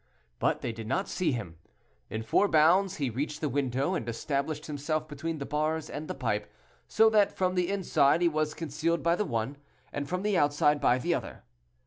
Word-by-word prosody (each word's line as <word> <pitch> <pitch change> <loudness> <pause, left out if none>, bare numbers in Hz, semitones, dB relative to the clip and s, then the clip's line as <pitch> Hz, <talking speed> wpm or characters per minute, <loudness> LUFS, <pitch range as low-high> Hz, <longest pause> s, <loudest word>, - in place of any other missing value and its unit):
but - - +1
they - - -2
did 115 -1 -8
not 190 - 0
see 180 -4 0
him. 85 -10 -5 0.5
In 110 +2 -4
four 200 - +3
bounds 175 +4 +4
he 135 -5 -2
reached 145 +5 -3
the 155 - -1
window, 135 +3 0
and 120 -10 -2
established 145 +5 -2
himself 155 +1 -2
between 155 +2 -4
the 140 - -5
bars 155 +2 -1
and 150 +1 -5
the - - -4
pipe, 105 -6 -2 0.4
so 220 0 +5
that 210 -2 +3
from 185 -1 +1
the 180 -1 0
inside 170 -5 +2
he - - +5
was 155 -1 0
concealed 165 +2 -1
by 170 0 +3
the 210 - -1
one, 120 - -2 0.4
and 145 -1 -4
from 180 +2 -2
the 210 -1 +1
outside 145 -1 +3
by 125 - +4
the 170 +7 0
other. - - -5
150 Hz, 200 wpm, -29 LUFS, 140-170 Hz, 0.5 s, so